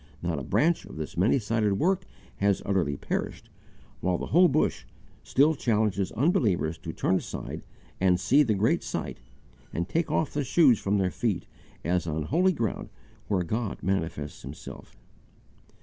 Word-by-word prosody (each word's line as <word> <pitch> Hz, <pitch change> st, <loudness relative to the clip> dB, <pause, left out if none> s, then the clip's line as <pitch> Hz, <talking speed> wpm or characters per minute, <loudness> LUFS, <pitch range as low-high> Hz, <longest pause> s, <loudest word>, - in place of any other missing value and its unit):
Not 85 Hz, -4 st, -1 dB
a -, -, -6 dB
branch 165 Hz, -, +1 dB
of -, -, -11 dB
this 80 Hz, -1 st, -5 dB
many 100 Hz, +10 st, +3 dB
sided 110 Hz, -3 st, +1 dB
work 185 Hz, -, +1 dB, 0.3 s
has 100 Hz, -1 st, +1 dB
utterly 85 Hz, -8 st, 0 dB
perished, -, -, -4 dB, 0.5 s
while 90 Hz, -1 st, 0 dB
the -, -, -4 dB
whole 180 Hz, +4 st, +5 dB
bush 150 Hz, +1 st, 0 dB, 0.4 s
still 145 Hz, +4 st, +3 dB
challenges 105 Hz, -, 0 dB
unbelievers 110 Hz, -, +1 dB
to 80 Hz, 0 st, -6 dB
turn 95 Hz, -, +1 dB
aside -, -, -6 dB, 0.4 s
and 90 Hz, -1 st, +3 dB
see 130 Hz, +11 st, +4 dB
the 115 Hz, -7 st, +2 dB
great 105 Hz, +4 st, +2 dB
sight, -, -, -4 dB, 0.5 s
and 85 Hz, +1 st, -2 dB
take 165 Hz, -, 0 dB
off 160 Hz, -, 0 dB
the 145 Hz, -, 0 dB
shoes 135 Hz, -, +4 dB
from 100 Hz, +1 st, 0 dB
their 95 Hz, -2 st, +1 dB
feet 100 Hz, -7 st, -1 dB, 0.4 s
as 85 Hz, 0 st, 0 dB
on 80 Hz, -1 st, -1 dB
holy 180 Hz, -, +3 dB
ground 115 Hz, -, -3 dB, 0.4 s
where 95 Hz, -3 st, +1 dB
God 110 Hz, +4 st, -3 dB
manifests 80 Hz, -6 st, -2 dB
Himself. -, -, -10 dB
100 Hz, 160 wpm, -27 LUFS, 90-140 Hz, 0.5 s, whole